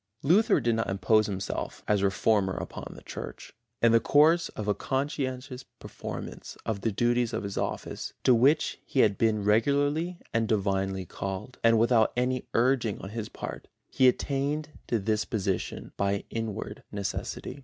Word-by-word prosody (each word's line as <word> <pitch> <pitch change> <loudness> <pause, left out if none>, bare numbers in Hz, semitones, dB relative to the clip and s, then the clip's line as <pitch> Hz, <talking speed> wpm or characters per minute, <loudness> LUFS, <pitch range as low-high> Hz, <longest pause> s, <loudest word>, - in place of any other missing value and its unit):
Luther 190 +10 +4
did 120 - +1
not 115 0 -1
impose 105 +3 +3
himself 100 -1 -4
as 105 -2 +2
reformer 100 0 +2
upon - - -6
the - - -12
Church. - - -8 0.3
In 115 - +6
the 115 - +6
course 160 +7 +4
of 105 - -6
a 105 - +3
conscientious 130 +2 -3 0.2
performance - - -7
of 105 -3 -2
the 115 - 0
duties 120 +2 +1
of - - -2
his 100 -1 -4
office, - - -3
to 130 - +6
which 135 +7 +3
he 130 - +1
had 100 -2 +4
been 110 -2 +2
regularly 145 - +2 0.2
and 115 -1 +1
divinely 95 -3 0
called, 95 +8 -6
and 115 0 +5
without 115 0 +4
any 125 0 0
urging 120 -3 +2
on 95 - -7
his 110 0 -5
part, - - -7 0.2
he 130 - +5
attained 140 +4 0 0.2
to 115 - +1
this 110 +1 0
position 100 -5 -3
by 100 0 0
inward 115 -3 -4
necessity. 100 +7 -4
115 Hz, 160 wpm, -28 LUFS, 100-130 Hz, 0.3 s, In